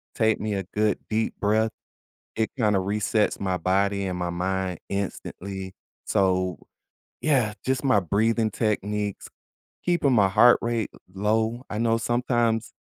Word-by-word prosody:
take 110 Hz, -1 st, +2 dB
me 105 Hz, 0 st, -2 dB
a 95 Hz, -1 st, -2 dB
good 105 Hz, +3 st, 0 dB
deep 110 Hz, +1 st, 0 dB
breath, 110 Hz, +2 st, +2 dB, 0.6 s
it 110 Hz, 0 st, 0 dB
kinda 105 Hz, -4 st, +3 dB
resets 105 Hz, +2 st, 0 dB
my 95 Hz, -2 st, -1 dB
body 100 Hz, +2 st, +1 dB
and 90 Hz, -1 st, -3 dB
my 90 Hz, 0 st, -1 dB
mind 90 Hz, 0 st, -2 dB
instantly. 95 Hz, -1 st, -5 dB, 0.3 s
So, 95 Hz, -3 st, +1 dB, 0.6 s
yeah, 130 Hz, -9 st, +2 dB
just 130 Hz, +1 st, 0 dB
my 105 Hz, -7 st, +4 dB
breathing 110 Hz, +4 st, +1 dB
techniques, 105 Hz, -1 st, -2 dB, 0.6 s
keeping 170 Hz, -7 st, +2 dB
my 100 Hz, -4 st, +5 dB
heart 120 Hz, +5 st, +6 dB
rate 115 Hz, -2 st, -1 dB
l -, -, -16 dB, 0.2 s
low. 110 Hz, +5 st, 0 dB
I 105 Hz, -, -4 dB
know 115 Hz, 0 st, +2 dB
sometimes 120 Hz, -1 st, 0 dB
105 Hz, 140 wpm, -25 LUFS, 95-115 Hz, 0.6 s, heart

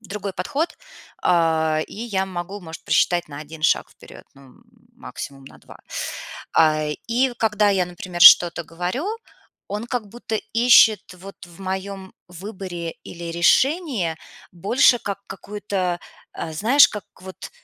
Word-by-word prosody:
другой 200 Hz, -1 st, -6 dB
подход, 280 Hz, -, -2 dB, 0.5 s
а, 160 Hz, -3 st, +2 dB
и -, -, -13 dB
я 205 Hz, -4 st, -2 dB
могу, 190 Hz, +2 st, -6 dB
может, 165 Hz, -3 st, -10 dB
просчитать 175 Hz, -3 st, +2 dB
на 140 Hz, -, -9 dB
1 155 Hz, +1 st, -11 dB
шаг 160 Hz, -, +2 dB
вперед, -, -, -15 dB
ну 135 Hz, -2 st, -18 dB, 0.4 s
максимум 135 Hz, -1 st, -9 dB
на -, -, -14 dB
2. -, -, -15 dB, 0.7 s
А, 155 Hz, -1 st, +3 dB, 0.2 s
и 250 Hz, +2 st, +2 dB
когда 210 Hz, -2 st, +2 dB
я, 190 Hz, -2 st, +1 dB
например, 175 Hz, 0 st, -8 dB
что-то 175 Hz, 0 st, +8 dB
говорю, 180 Hz, -, -4 dB, 0.7 s
он 210 Hz, +3 st, -4 dB
как 240 Hz, -4 st, -3 dB
будто 225 Hz, +1 st, -6 dB, 0.2 s
ищет 230 Hz, -5 st, +5 dB
вот 190 Hz, 0 st, -12 dB
в 175 Hz, +1 st, -17 dB
моем 190 Hz, 0 st, -5 dB
выборе 180 Hz, -2 st, -7 dB
или 170 Hz, 0 st, -8 dB
решении 215 Hz, -, +2 dB, 0.3 s
больше 240 Hz, +9 st, +3 dB
как 200 Hz, -2 st, -5 dB
какую-то, 195 Hz, -4 st, -4 dB, 0.3 s
э, 160 Hz, -, -5 dB
знаешь, 235 Hz, -, +5 dB
как 210 Hz, -, -7 dB, 0.2 s
вот 185 Hz, 0 st, -10 dB
190 Hz, 135 wpm, -22 LUFS, 170-215 Hz, 0.7 s, что-то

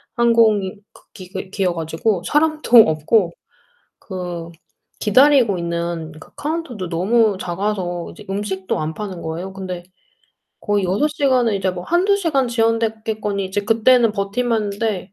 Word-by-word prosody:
항공이 225 Hz, -4 st, +3 dB, 0.2 s
그 -, -, -18 dB
기 190 Hz, -1 st, -8 dB
기여 185 Hz, -4 st, 0 dB
가지고 170 Hz, +4 st, -1 dB
사람도 305 Hz, -, +3 dB
없고 165 Hz, +4 st, +2 dB, 0.7 s
그 175 Hz, -3 st, -6 dB, 0.5 s
기다리고 245 Hz, -2 st, +4 dB
있는 170 Hz, -1 st, -3 dB
그 -, -, -16 dB
카운터도 290 Hz, -, -4 dB
너무 205 Hz, +4 st, +2 dB
작아서 175 Hz, -1 st, -3 dB
이제 205 Hz, -, -13 dB
음식도 195 Hz, -1 st, -3 dB
안 155 Hz, +1 st, -3 dB
파는 190 Hz, -4 st, -6 dB
거예요. 170 Hz, +4 st, -5 dB
근데 185 Hz, -2 st, -6 dB, 0.8 s
거의 205 Hz, -2 st, 0 dB
6 200 Hz, +12 st, +1 dB
시간을 260 Hz, -7 st, +1 dB
이제 190 Hz, -1 st, 0 dB
뭐 180 Hz, -1 st, -6 dB
1-2 370 Hz, +4 st, +2 dB
시간 305 Hz, -9 st, +1 dB
지연됐겠거니 220 Hz, -3 st, -1 dB
이제 190 Hz, +2 st, -2 dB
그때는 230 Hz, +1 st, +4 dB
버틸만 220 Hz, +3 st, -1 dB
했는데 200 Hz, -2 st, -3 dB
205 Hz, 285 characters per minute, -20 LUFS, 180-230 Hz, 0.8 s, 기다리고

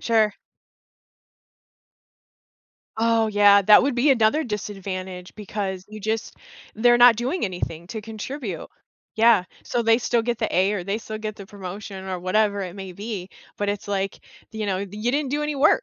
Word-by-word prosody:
Sure. 220 Hz, -2 st, +2 dB, 2.7 s
Oh 225 Hz, 0 st, +3 dB
yeah, 205 Hz, -1 st, +6 dB
that 210 Hz, +2 st, +7 dB
would 275 Hz, 0 st, 0 dB
be 255 Hz, +4 st, +3 dB
another 260 Hz, +5 st, +3 dB
disadvantage 190 Hz, -4 st, -5 dB
because 195 Hz, -3 st, -4 dB
you 215 Hz, 0 st, -9 dB
just 220 Hz, +2 st, -3 dB, 0.4 s
they're 240 Hz, +2 st, +4 dB
not 240 Hz, -1 st, +8 dB
doing 255 Hz, +9 st, -1 dB
anything 175 Hz, -3 st, -4 dB
to 220 Hz, +1 st, -5 dB
contribute. 220 Hz, -, -6 dB, 0.5 s
Yeah, 225 Hz, -4 st, +5 dB, 0.2 s
so 240 Hz, -, -1 dB
they 225 Hz, 0 st, +5 dB
still 240 Hz, -1 st, +1 dB
get 240 Hz, 0 st, -2 dB
the -, -, -2 dB
A 190 Hz, +3 st, +3 dB
or 195 Hz, -4 st, -3 dB
they 200 Hz, +3 st, -1 dB
still 220 Hz, -1 st, -7 dB
get 215 Hz, -1 st, -5 dB
the 200 Hz, -, -10 dB
promotion 195 Hz, 0 st, -8 dB
or 185 Hz, -1 st, -3 dB
whatever 200 Hz, +3 st, +1 dB
it 180 Hz, -2 st, -5 dB
may 190 Hz, -2 st, -7 dB
be, 200 Hz, -1 st, -6 dB, 0.3 s
but 205 Hz, -, -2 dB
it's 205 Hz, 0 st, -3 dB
like, 195 Hz, -1 st, -2 dB, 0.3 s
you 220 Hz, -1 st, -4 dB
know, 190 Hz, -2 st, 0 dB
"You 205 Hz, +4 st, -3 dB
didn't 285 Hz, 0 st, -1 dB
do 295 Hz, +2 st, -1 dB
any 300 Hz, 0 st, -2 dB
work," 300 Hz, -, +4 dB
210 Hz, 170 wpm, -23 LUFS, 195-230 Hz, 2.7 s, not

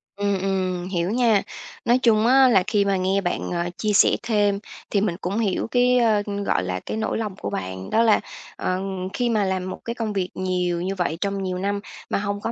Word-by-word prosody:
Ừm, 200 Hz, -1 st, 0 dB
ừm, 185 Hz, -2 st, -1 dB
hiểu 180 Hz, 0 st, -1 dB
nha. 230 Hz, -4 st, +3 dB, 0.4 s
Nói 240 Hz, +2 st, +4 dB
chung 230 Hz, -3 st, +3 dB
á, 265 Hz, +1 st, +6 dB
là 195 Hz, -7 st, +4 dB
khi 205 Hz, -2 st, +2 dB
mà 195 Hz, -1 st, +1 dB
nghe 190 Hz, +2 st, +1 dB
bạn, 175 Hz, -2 st, -2 dB
ờ, 175 Hz, 0 st, -1 dB
chia 210 Hz, -1 st, 0 dB
sẻ -, -, +5 dB
thêm 205 Hz, -3 st, +1 dB, 0.3 s
thì 200 Hz, -, +1 dB
mình 195 Hz, -5 st, 0 dB
cũng 190 Hz, +4 st, -2 dB
hiểu 205 Hz, -3 st, 0 dB
cái, 250 Hz, 0 st, +4 dB
ơ, 220 Hz, -3 st, +3 dB, 0.2 s
gọi -, -, +1 dB
là, 90 Hz, 0 st, -2 dB
cái -, -, -3 dB
nỗi 220 Hz, -, -1 dB
lòng 210 Hz, -4 st, -3 dB
của 100 Hz, -, -5 dB
bạn, 95 Hz, -1 st, -5 dB
đó 225 Hz, +1 st, +3 dB
là, 220 Hz, -2 st, +5 dB, 0.4 s
ừm, 185 Hz, 0 st, -2 dB
khi 240 Hz, +2 st, 0 dB
mà 215 Hz, -3 st, +2 dB
làm 185 Hz, -1 st, -1 dB
một -, -, -6 dB
cái 235 Hz, -, -2 dB
công 225 Hz, -3 st, -3 dB
việc 185 Hz, -2 st, -1 dB
nhiều 180 Hz, -2 st, -1 dB
như 190 Hz, +2 st, -2 dB
vậy 175 Hz, -3 st, -1 dB
trong 200 Hz, -1 st, -1 dB
nhiều 185 Hz, -1 st, -2 dB
năm 200 Hz, +2 st, -1 dB, 0.3 s
mà -, -, +1 dB
hông 205 Hz, 0 st, -3 dB
có 230 Hz, -, -2 dB
200 Hz, 230 wpm, -23 LUFS, 185-220 Hz, 0.4 s, á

